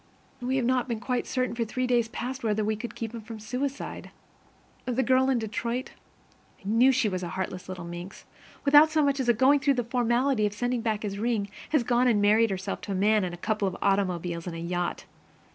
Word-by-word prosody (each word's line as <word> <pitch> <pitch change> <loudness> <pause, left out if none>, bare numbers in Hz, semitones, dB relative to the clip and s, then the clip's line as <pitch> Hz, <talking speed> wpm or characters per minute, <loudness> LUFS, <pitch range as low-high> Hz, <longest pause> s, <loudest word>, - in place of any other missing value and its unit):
We 255 +2 -1
have 260 -3 +1
not 255 0 +1
been 230 -3 -2
quite 250 +1 -2
certain 255 -2 -1
for 235 0 -1
three 255 +3 -2
days 240 -2 +2
past 250 +3 -5
whether 215 -1 0
we 215 +1 0
could 225 +1 -7
keep 230 -1 -5
him 230 - -6
from 220 0 -9
suicide. 255 +6 -4 0.8
The 255 +1 0
girl 260 +1 +3
in 260 - +2
Detroit, 235 +3 -3 0.7
I - - -26
knew 235 +5 +5
she 260 -3 +2
was 185 -3 -2
a 175 - -4
heartless 185 +1 -5
little 180 -2 -6
minx, 175 +2 -8 0.4
without 295 +2 +7
so 310 -1 +2
much 280 -1 +1
as 255 -2 0
going 260 +5 +5
through 275 0 +2
the 245 - 0
formality 240 0 +1
of 205 - -5
sending 245 +2 -1
back 220 -2 -1
his 200 -1 -4
ring, 220 -3 0 0.2
has 300 -5 +2
gone 245 +1 +2
and 225 -4 +3
married 215 +2 +4
herself 195 0 -4
to 200 - -4
a - - -2
man 210 +2 +3
and 175 -1 -3
a - - -13
couple 210 +2 -1
of 185 - -4
automobiles 180 -3 0
and 170 - -4
a - - -5
yacht. 175 +1 -3
230 Hz, 225 wpm, -27 LUFS, 200-255 Hz, 0.8 s, without